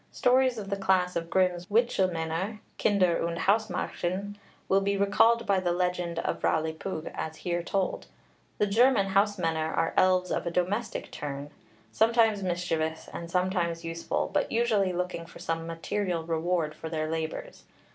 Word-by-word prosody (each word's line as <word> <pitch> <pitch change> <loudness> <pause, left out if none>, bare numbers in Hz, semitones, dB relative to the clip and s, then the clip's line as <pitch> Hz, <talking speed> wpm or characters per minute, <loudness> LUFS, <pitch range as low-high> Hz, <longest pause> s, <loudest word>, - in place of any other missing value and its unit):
Stories 255 0 +3
of 200 -2 -6
the - - +2
class 190 -2 +1
of 165 0 -2
Grimm's 180 -1 +1
Witchelmänner 190 -3 0 0.2
(Kinder 185 -5 +3
und 170 0 -2
Hausmärchen) 200 -1 -1 0.3
will 195 +1 +3
be 200 0 0
recalled 225 +4 +4
by 195 -1 +2
the 180 -2 0
legend 180 -1 -1
of - - -2
Rowli 160 0 +1
Pugh 160 -1 -5
as 160 0 -4
here 175 -1 0
told. 190 +2 -2 0.5
The 210 - +3
German 210 -1 +4
Hausmänner 175 -6 +1
are 165 - +1
elves 185 0 +3
of - - -1
a - - +2
domestic 190 +7 -2
turn, 145 0 -6 0.4
sometimes 225 -2 +3
mischievous 170 -3 -2
and 170 0 -6
sometimes 175 -2 0
useful, 165 0 -2
but - - +1
usually 220 -5 +2
looking 180 -1 -3
for - - -13
some 165 0 -3
material 170 +1 -2
reward 165 -1 0
for 160 +1 -7
their 155 -1 -2
labours. 160 - -4
180 Hz, 155 wpm, -28 LUFS, 165-200 Hz, 0.5 s, recalled